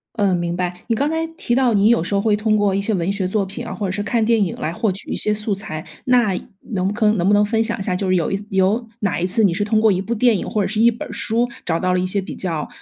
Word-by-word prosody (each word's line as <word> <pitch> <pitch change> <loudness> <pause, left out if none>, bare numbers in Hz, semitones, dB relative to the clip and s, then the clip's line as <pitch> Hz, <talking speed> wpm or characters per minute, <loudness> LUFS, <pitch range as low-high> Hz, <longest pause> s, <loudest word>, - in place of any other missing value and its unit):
嗯， 200 -4 +2
明 175 0 -2
白。 180 -1 -1
你 230 - +1
刚 285 +6 0
才 320 0 -1
提 240 - -1
到 255 -3 +3
你 205 +1 +4
有 235 -9 +3
时 185 - -4
候 200 - +2
会 215 -1 +2
通 215 +1 +1
过 205 -2 +2
一 200 - 0
些 215 +2 +1
文 175 0 -1
学 200 -2 -1
作 200 +1 0
品 195 - -6
啊， - - -5
或 210 - -4
者 - - -2
是 205 +2 -2
看 225 +1 0
电 225 -2 +3
影 175 - -2
来 160 +2 -3
获 215 +3 0
取 190 - -8
一 - - -1
些 210 - +1
素 210 0 -1
材， 155 -6 -6 0.2
那 245 -5 +3 0.4
能 185 -2 0
不 200 - -1
坑 215 -1 +2
能 175 - +1
不 205 - +4
能 205 0 +4
分 225 +1 +1
享 225 -2 -3
一 - - -3
下， 185 -2 -1
就 190 +1 -2
是 185 - +3
有 170 0 0
一 195 +1 -2
有 195 +5 +1 0.2
哪 200 -4 0
一 175 - 0
次 220 +4 +2
你 185 -4 +4
是 205 - -1
通 215 +1 +2
过 220 -1 +4
一 185 0 0
部 215 +5 -3
电 235 +1 +3
影 - - -4
或 215 - 0
者 - - 0
是 215 +2 -3
一 235 - +7
本 235 - -7
儿 - - -10
书 235 +2 0 0.2
找 165 -1 -1
到 185 0 +1
了 180 - +2
一 185 - -1
些 200 +2 +1
比 190 - -6
较， 165 -5 -3
205 Hz, 355 characters per minute, -20 LUFS, 185-220 Hz, 0.4 s, 一